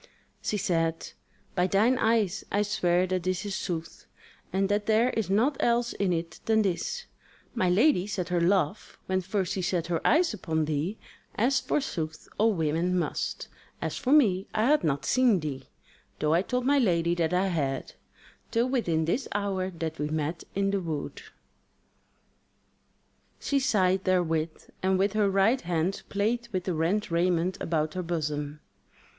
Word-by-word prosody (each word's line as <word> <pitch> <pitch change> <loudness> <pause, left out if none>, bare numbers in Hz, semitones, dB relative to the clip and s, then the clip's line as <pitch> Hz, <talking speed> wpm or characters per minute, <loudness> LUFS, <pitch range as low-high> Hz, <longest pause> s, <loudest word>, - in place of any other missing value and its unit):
She 210 - -1
said: 165 -3 -1 0.4
"By 180 0 +2
thine 225 +7 +3
eyes 220 -5 +1
I 205 +1 +2
swear 180 -3 +1
that 185 0 -1
this 185 +2 -2
is 200 - -3
sooth, 165 -3 -5 0.4
and 195 +1 +1
that 205 +1 0
there 225 +3 +3
is 220 -6 -2
naught 240 +8 +2
else 240 0 +1
in 195 -2 0
it 165 -1 -3
than 220 -1 +3
this: 205 - -2 0.5
My 185 -7 +1
lady 200 - +3
set 185 -4 -3
her 175 -1 +1
love, 185 +1 0
when 185 0 0
first 190 0 -1
she 190 - -2
set 180 -2 0
her 165 - 0
eyes 330 -3 +3
upon 160 -6 -1
thee 155 +7 -2 0.4
as 255 +5 +2
forsooth 160 - -3
all 225 +2 +4
women 165 +1 0
must: 175 - -2 0.3
as - - -3
for 260 -2 -2
me, 205 -10 +4
I 215 - +2
had 295 +5 +3
not 140 -3 0
seen 245 -6 +3
thee 140 -4 -5 0.5
(though 150 0 +1
I 170 - +4
told 250 +5 -2
my 285 +1 +4
lady 170 -7 +2
that 170 -1 0
I 185 +2 +2
had) 140 -6 -2 0.6
till 235 +2 +1
within 170 -12 +1
this 230 - -1
hour 195 -2 -1
that 165 -3 -5
we 150 - -1
met 155 +2 -2
in 195 0 +1
the 200 -1 0
wood." 165 - -4 2.2
She 280 - +1
sighed 190 -7 +2
therewith, 165 -4 0
and 190 0 +2
with 195 +2 +1
her 210 -2 +2
right 195 +7 +3
hand 175 +2 -1
played 230 +4 0
with 185 -3 -2
the 185 - -2
rent 170 +5 0
raiment 175 +1 +1
about 155 -2 -1
her 185 - -2
bosom. 150 -3 -3
185 Hz, 165 wpm, -28 LUFS, 165-215 Hz, 2.2 s, all